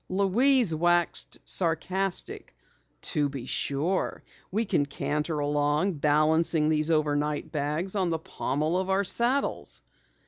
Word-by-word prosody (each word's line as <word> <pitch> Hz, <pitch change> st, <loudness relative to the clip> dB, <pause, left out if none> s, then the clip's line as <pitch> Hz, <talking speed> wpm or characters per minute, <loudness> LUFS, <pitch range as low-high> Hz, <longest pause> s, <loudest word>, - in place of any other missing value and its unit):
Louise 205 Hz, +3 st, +2 dB
waxed 175 Hz, +2 st, +1 dB
sarcastic. 180 Hz, -, -1 dB, 0.5 s
"To 145 Hz, -1 st, 0 dB
be 135 Hz, -3 st, -7 dB
sure. 150 Hz, +9 st, -1 dB, 0.3 s
We 220 Hz, +4 st, -1 dB
can 145 Hz, -8 st, 0 dB
canter 150 Hz, +2 st, -2 dB
along 145 Hz, +4 st, 0 dB
balancing 155 Hz, +1 st, +2 dB
these 155 Hz, 0 st, +2 dB
overnight 150 Hz, -1 st, 0 dB
bags 155 Hz, +6 st, -2 dB
on 185 Hz, -3 st, +1 dB
the 165 Hz, -, 0 dB
pommel 155 Hz, +2 st, -2 dB
of 190 Hz, 0 st, -3 dB
our 195 Hz, +1 st, +2 dB
saddles!" 240 Hz, +7 st, 0 dB
160 Hz, 115 wpm, -27 LUFS, 150-190 Hz, 0.5 s, Louise